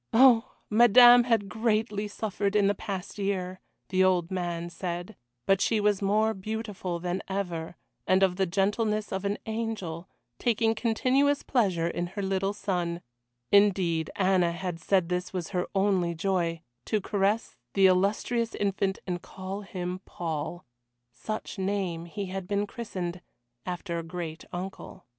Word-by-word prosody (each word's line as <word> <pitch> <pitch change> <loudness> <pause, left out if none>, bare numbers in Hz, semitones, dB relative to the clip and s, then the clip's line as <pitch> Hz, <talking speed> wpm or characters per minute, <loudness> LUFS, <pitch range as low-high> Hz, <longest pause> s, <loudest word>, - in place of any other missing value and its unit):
Oh! 245 0 +6
Madame 240 +2 +8
had 225 -5 +2
greatly 215 0 0
suffered 205 -1 -2
in 205 -1 +4
the 200 - +3
past 200 -1 -6
year 185 -2 -2 0.3
the 185 0 +3
old 180 -1 +2
man 175 -2 -3
said, 175 0 -5 0.3
but 195 0 +3
she 225 - +2
was 205 -1 +2
more 215 +3 +2
beautiful 205 -3 -4
than 180 +2 -3
ever, 175 -4 -3 0.3
and 185 +1 +4
of 185 -2 +3
the 190 0 +1
gentleness 210 +3 0
of 190 +1 -3
an 200 +1 0
angel, 215 -7 -4 0.3
taking 230 -2 +2
continuous 255 +5 +2
pleasure 190 - +1
in 175 +1 -2
her 195 +3 -5
little 195 0 0
son 180 -4 -2 0.5
indeed, 185 -6 +3
Anna 185 -3 +3
had 175 -1 -4
said 185 +1 +2
this 180 +1 -2
was 180 -3 -3
her 180 -2 -1
only 190 -3 +2
joy, 170 -2 -1 0.2
to 215 - +1
caress 205 +2 0 0.2
the 195 - +5
illustrious 205 +5 +2
infant 195 -1 0
and 175 -2 -3
call 190 +3 -6
him 185 -3 -5
Paul 165 +1 -4 0.5
such 215 - -6
name 190 -4 -1
he 200 +4 -5
had 190 0 -5
been 205 +1 0
christened 185 -6 -5 0.5
after 175 -1 -3
a - - -5
great 165 -1 -6
uncle. 185 +2 -7
195 Hz, 150 wpm, -28 LUFS, 180-210 Hz, 0.5 s, Madame